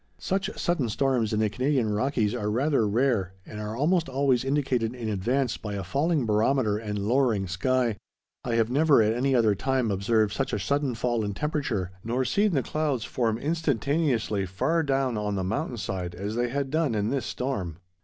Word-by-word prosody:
Such 190 +1 -1
sudden 155 -9 0
storms 125 -2 +1
in 110 - 0
the 110 -1 +2
Canadian 125 -2 +1
Rockies 110 -1 0
are 105 - -2
rather 125 0 +2
rare, 105 -4 +1
and 105 -1 -7
are 105 +2 -4
almost 165 +3 +2
always 130 -2 +2
indicated 130 -4 0
in 115 -3 -4
advance 120 +5 0
by 105 -2 -5
a 100 - -3
falling 140 - 0
barometer 110 0 +2
and 105 -2 -4
lowering 110 -1 +1
sky. 115 +5 0 0.5
I 120 -2 -1
have 115 0 +2
never 145 -3 +5
at 110 +1 +2
any 130 +3 +1
other 110 -4 +4
time 125 +2 0
observed 105 +2 +1
such 135 - -2
a - - 0
sudden 140 -3 0
fall 120 0 0
in 100 -1 -3
temperature, 130 - -2
nor 125 +3 -1
seen 205 +4 +2
the 135 -4 +1
clouds 145 -7 -1
form 115 -3 0
instantaneously 140 - 0
far 155 - 0
down 135 -6 0
on 105 -1 -2
the 95 - -1
mountain 120 - -2
side 90 -4 -4
as 100 +4 -4
they 120 +1 0
had 140 +1 -2
done 155 -6 +1
in 105 +1 0
this 135 -5 -1
storm. 100 - -3
120 Hz, 190 wpm, -27 LUFS, 105-140 Hz, 0.5 s, never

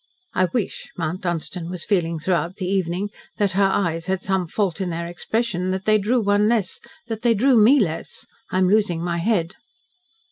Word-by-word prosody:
"I 185 - +3
wish," 195 +4 -3
Mount 170 +2 -2
Dunstan 175 0 -3
was 180 -2 -5
feeling 170 -5 +1
throughout 170 +1 -1
the 185 - -4
evening, 190 +1 -1 0.3
"that 205 -2 +2
her 195 0 +3
eyes 165 -3 -1
had 190 0 0
some 190 -1 -1
fault 190 0 -1
in 185 - -1
their 170 0 -3
expression 185 +1 -2
that 190 +1 -2
they 215 0 +4
drew 230 +5 +1
one 205 +1 +3
less 215 -6 0 0.3
that 225 -2 -5
they 235 -1 +3
drew 255 +5 +4
ME 235 +6 +6
less. 165 -8 -3 0.2
I - - -1
am 185 0 +4
losing 195 -4 +2
my 170 -1 -1
head." 175 -2 0
185 Hz, 190 wpm, -22 LUFS, 175-210 Hz, 0.3 s, ME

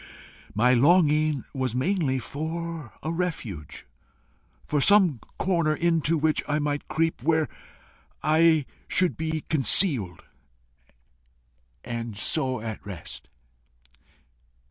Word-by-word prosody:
My 125 +4 +4
longing 150 +1 +3
was 130 -4 -2
mainly 145 -1 0
for 160 0 -5
a 160 - -2
refuge, 115 - -5 0.8
for 150 -2 0
some 185 - +4 0.2
corner 170 -5 +1
into 165 -1 +1
which 155 0 +1
I 150 - 0
might 145 -1 -2
creep, 165 -4 -1
where 160 +2 +2 0.8
I 160 0 +4 0.2
should 185 -2 +1
be 160 0 -3
concealed 135 - +3 1.6
and 115 -3 -5
so 130 +1 -1
at 110 -1 -6
rest. 90 -6 -9
150 Hz, 100 wpm, -26 LUFS, 130-165 Hz, 1.6 s, My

